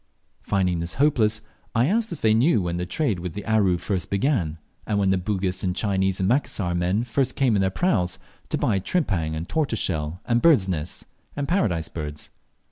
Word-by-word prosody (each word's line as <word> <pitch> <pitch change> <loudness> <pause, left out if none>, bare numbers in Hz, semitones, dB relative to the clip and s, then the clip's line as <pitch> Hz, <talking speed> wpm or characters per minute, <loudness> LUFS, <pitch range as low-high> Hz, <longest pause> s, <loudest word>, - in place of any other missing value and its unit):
Finding 90 -4 0
this 85 0 -3
hopeless, 115 -6 +2 0.3
I 115 +2 +4
asked 220 +7 +1
if 170 - -6
they 110 -1 +4
knew 115 - +3
when 85 0 -2
the 90 0 -3
trade 110 - 0
with 90 +2 -5
Aru 105 -5 +3
first 90 -2 -3
began, 100 - 0 0.3
when 100 -2 +2
the 95 - +3
Bugis 95 -1 -2
and 90 -1 0
Chinese 95 -2 0
and 95 - +1
Macassar 105 -7 0
men 90 +5 +1
first 125 +2 -1
came 130 -5 +2
in 100 - +2
their 95 - +2
praus 95 - 0 0.3
to - - 0
buy 100 - +1
tripang 95 - -1
and 80 +2 -4
tortoise 150 -8 0
shell, 80 -2 -2
and 120 0 +2
birds' 145 - +5
nests, 85 -3 -4 0.3
and 145 -1 -2
Paradise 95 - +1
birds? 75 -2 -6
95 Hz, 190 wpm, -24 LUFS, 90-120 Hz, 0.3 s, birds